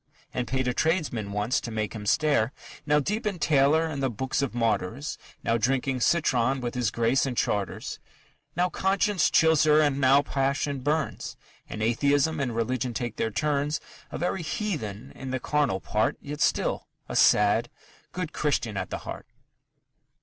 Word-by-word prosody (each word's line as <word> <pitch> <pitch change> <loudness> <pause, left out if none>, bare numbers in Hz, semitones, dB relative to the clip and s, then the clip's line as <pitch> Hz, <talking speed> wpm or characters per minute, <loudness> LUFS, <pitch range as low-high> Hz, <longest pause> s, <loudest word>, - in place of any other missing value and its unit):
And 125 -1 -2
paid 130 -1 -1
a 125 - +1
tradesman 150 - 0
once, 105 +5 0
to - - -6
make 110 -2 -3
him 105 -2 -6
stare;... 145 -3 +2 0.4
Now 150 0 +4
deep 210 +9 -2
in 200 -3 -2
Taylor 150 0 +3
and 150 -4 -4
the 135 - +1
Book 130 +3 -5
of 135 -4 -2
Martyrs, 115 +4 -1 0.2
Now 115 0 +1
drinking 130 +2 0
citron 130 -3 +2
with 120 -1 -3
his 125 -3 0
Grace 120 +5 +1
and 125 -3 -4
Chartres; 100 -3 -2 0.6
Now 180 +2 +2
conscience 195 +2 +1
chills 160 -2 +4
her 150 0 +5
and 145 -2 +2
now 135 +2 +5
passion 140 +1 -1
burns; 150 +3 -2 0.3
And 110 - -4
atheism 140 +6 +2
and 125 -4 -2
religion 120 +1 -1
take 120 -1 -3
their 115 - 0
turns; 150 +4 0 0.3
A - - -5
very 175 +1 -1
heathen 155 - -4
in 135 - -8
the 130 0 -2
carnal 145 -9 0
part, 110 +2 0
Yet 145 +1 -7
still - - +1 0.2
a - - -5
sad, 105 +3 +4 0.4
good 180 -3 -4
Christian 120 -8 -1
at - - -3
the - - -3
heart. - - -7
135 Hz, 170 wpm, -27 LUFS, 115-150 Hz, 0.6 s, her